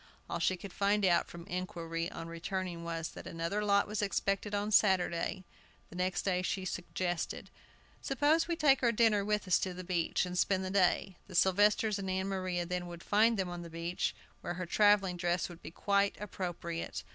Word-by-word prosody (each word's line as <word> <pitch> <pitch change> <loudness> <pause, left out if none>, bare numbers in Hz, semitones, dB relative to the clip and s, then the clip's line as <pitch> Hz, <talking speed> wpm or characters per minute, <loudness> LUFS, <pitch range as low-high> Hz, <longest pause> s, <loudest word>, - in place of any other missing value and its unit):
All - - -3
she 185 - +1
could 190 +1 -9
find 200 0 +2
out, 175 -2 +3
from 170 0 -9
inquiry, 170 -3 -3
on 165 - -7
returning, 170 +1 -4
was, 165 -1 -3
"that - - -10
another 170 +6 -2
lot 200 -1 +3
was 210 0 -2
expected 200 0 -1
on 205 +1 -1
Saturday." 190 -2 +2 0.5
The - - -10
next 180 0 -1
day 180 -2 +1
she 185 +1 -2
suggested: 175 -1 -3 0.5
"Suppose 295 +5 +2
we 340 - 0
take 290 -4 +4
our 240 -2 +4
dinner 220 -3 +3
with 210 -1 -1
us 185 - +4
to 185 -2 -3
the 185 - -6
beach, 175 0 0
and 180 0 -5
spend 190 0 +2
the 185 - -3
day." 190 -1 +2
The 185 - -10
Sylvesters 205 +3 +3
and 190 -1 -4
Ann 190 +1 -1
Maria 185 -2 -2
then 180 0 -3
would 170 -1 -9
find 220 +2 +3
them 190 -2 -1
on 175 0 -5
the 170 - -8
beach, 165 +2 -2 0.3
where 175 - -4
her 180 0 -4
travelling 195 -1 +3
dress 175 0 0
would 175 -1 -11
be - - -8
quite 200 +4 +1
appropriate. 175 -4 -4
185 Hz, 195 wpm, -32 LUFS, 175-205 Hz, 0.5 s, take